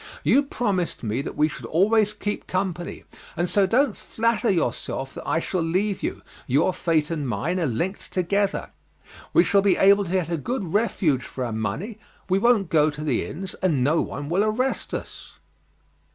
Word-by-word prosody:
You 280 - +5
promised 205 - -2
me 115 +4 -1
that - - -6
we 150 +1 +4
should 155 - -8
always 210 +5 +3
keep 210 -1 -4
company; 185 -2 -3 0.3
and 175 +2 +1
so 195 +1 +3
don't 265 +8 +2
flatter 230 +1 0
yourself 135 -6 -1
that - - -8
I - - +1
shall 175 +2 -1
leave 185 +5 0
you, - - -4 0.2
your 145 +8 +2
fate 160 -3 0
and 150 -4 -2
mine 155 - -1
are 165 - +1
linked 170 - -3
together. 200 +2 0 0.6
We - - +5
shall 200 - +3
be 195 -1 +3
able 200 +1 +5
to 175 - -6
get 185 -3 0
a 170 - 0
good 235 - -3
refuge 190 - +1
for 130 - -5
our 115 - -4
money, 140 - -3 0.3
we 190 0 +2
won't 215 -5 +3
go 155 -1 +4
to 150 0 -6
the 140 -6 0
inns, 190 +3 -6
and 155 -9 +2
no 155 +5 +3
one 145 0 -5
will 180 +6 +2
arrest 240 +5 -1
us." - - -7
185 Hz, 185 wpm, -24 LUFS, 155-205 Hz, 0.6 s, You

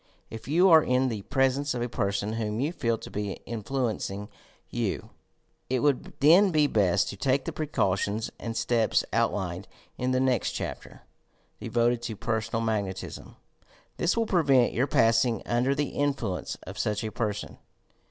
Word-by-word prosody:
If 115 +1 -8
you 170 +7 +4
are 160 -1 +9
in 130 -1 +1
the 110 -4 -4
pres 135 +3 +1
ence 140 -2 -2
of 120 - -1
a - - -1
person 100 -2 -1
whom 110 -1 -2
you 145 +6 -1
feel 115 -8 0
to - - -10
be 100 -1 -3
influencinjr 110 -3 -3 0.4
you, - - -3 0.6
it 130 -1 +1
would 145 -3 0
then 175 +8 +7
be 155 -4 +3
best 100 -7 +2
to - - -6
take 130 +6 0
the - - -2
precautions 105 -7 -1
and 115 -1 -4
steps 115 -2 +1
out 115 0 +3
lined 95 -2 -4 0.3
in 125 - 0
the 130 0 +2
nest 130 -4 +1
chapter, - - -6 0.6
devoted 120 0 +1
to 120 -2 -4
"Personal 115 +1 -2
Magnet 100 -4 -1
ism." - - -9 0.6
This 175 +6 +1
will 230 - +2
prevent 140 - +3
your 125 +4 +1
passing 115 -1 +3
under 125 +3 +1
the 145 -1 -2
influ 135 -10 -1
ence - - -6
of - - -8
such 105 0 -1
a 110 - -3
person. 105 -2 -4
120 Hz, 170 wpm, -27 LUFS, 105-135 Hz, 0.6 s, are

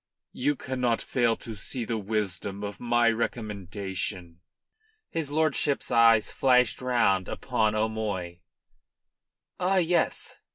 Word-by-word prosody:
You 145 +3 0
cannot 125 -3 -1
fail 120 -3 +1
to 115 - -7
see 115 +4 -5
the 115 -1 -2
wisdom 100 -1 -3
of 100 0 -5
my 120 -1 +3
recommendation." 100 -5 -3 0.7
His 160 -3 -2
lordship's 150 -2 0
eyes 115 -2 +5
flashed 125 -3 +3
round 115 -7 +2
upon 110 -1 0
O'Moy. 105 -5 -2 1.2
"Ah 190 +2 +2
yes!" 175 -1 +1
115 Hz, 110 wpm, -27 LUFS, 100-125 Hz, 1.2 s, eyes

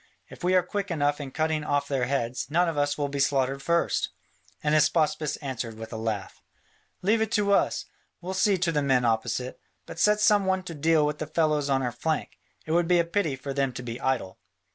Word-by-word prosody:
If - - -12
we 180 +1 +3
are 180 - +5
quick 205 +2 -3
enough 145 -3 0
in 140 - -5
cutting 155 +2 -1
off 145 -1 0
their 135 -3 0
heads, 125 -2 -2
none 175 +4 +2
of 165 - -2
us 145 0 0
will 145 -1 0
be 140 0 -4
slaughtered 135 -1 +1
first." 170 +4 +1 0.5
And 150 0 +1
Hystaspas 155 -1 +2
answered 120 -5 -4
with 110 +1 -8
a - - -4
laugh: 110 -4 -4 0.6
"Leave 220 +4 +3
it 220 -1 0
to 205 -2 +2
us! - - +1 0.3
We'll 185 +2 -5
see 190 +1 +3
to 175 -1 0
the 150 -2 +1
men 130 -3 +2
opposite. 120 +2 -1 0.3
But - - -9
set 210 +3 +4
some 210 -2 +4
one 190 0 +1
to 175 - -7
deal 155 0 +3
with 150 0 -2
the 155 - -4
fellows 155 -2 +1
on 135 -1 +2
our 125 - -1
flank: 155 +6 -3 0.3
it 155 - -5
would 170 +1 +2
be 180 0 +4
a 170 - +3
pity 170 -5 0
for 135 +1 -6
them 135 -1 0
to 125 - -7
be 120 0 -6
idle." 130 -8 -1
150 Hz, 225 wpm, -27 LUFS, 130-170 Hz, 0.6 s, are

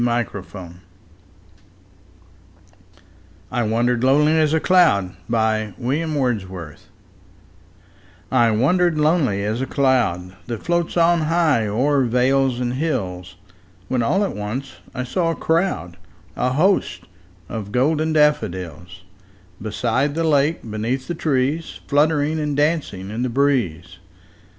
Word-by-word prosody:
William 120 0 +1
Wordsworth 90 -2 -9 2.8
I 120 - 0
Wandered 120 +2 +1
Lonely 150 +4 +4
As 155 -1 +2
a 160 - +2
Cloud 150 - +3 0.2
I 110 -2 +1 2.8
WANDERED 160 +10 +2
lonely 150 - +2
as 110 +4 -2
a 135 - -2
cloud 115 -10 0
That 115 -3 -5
floats 170 0 -1
on 170 0 +4
high 155 -8 +2
o'er 135 +6 +1
vales 125 +1 +2
and 125 -1 -1
hills, 95 - -3 0.5
When 130 -2 +1
all 170 - +1
at 200 - -3
once 115 +7 -5 0.2
I 125 - -2
saw 165 +7 -1
a 165 - -1
crowd, 160 - -1 0.4
A 125 +1 0
host, 155 - +1 0.5
of 105 -2 -6
golden 155 +6 +1
daffodils; 90 - 0 0.6
Beside 120 +7 -1
the 165 - 0
lake, 150 -2 +1
beneath 115 +5 -3
the 175 - -2
trees, 150 0 -1
Fluttering 150 +1 +1
and 150 -2 -2
dancing 145 - -1
in 110 +3 -4
the 130 - 0
breeze. 120 - 0
130 Hz, 115 wpm, -21 LUFS, 110-155 Hz, 2.8 s, Lonely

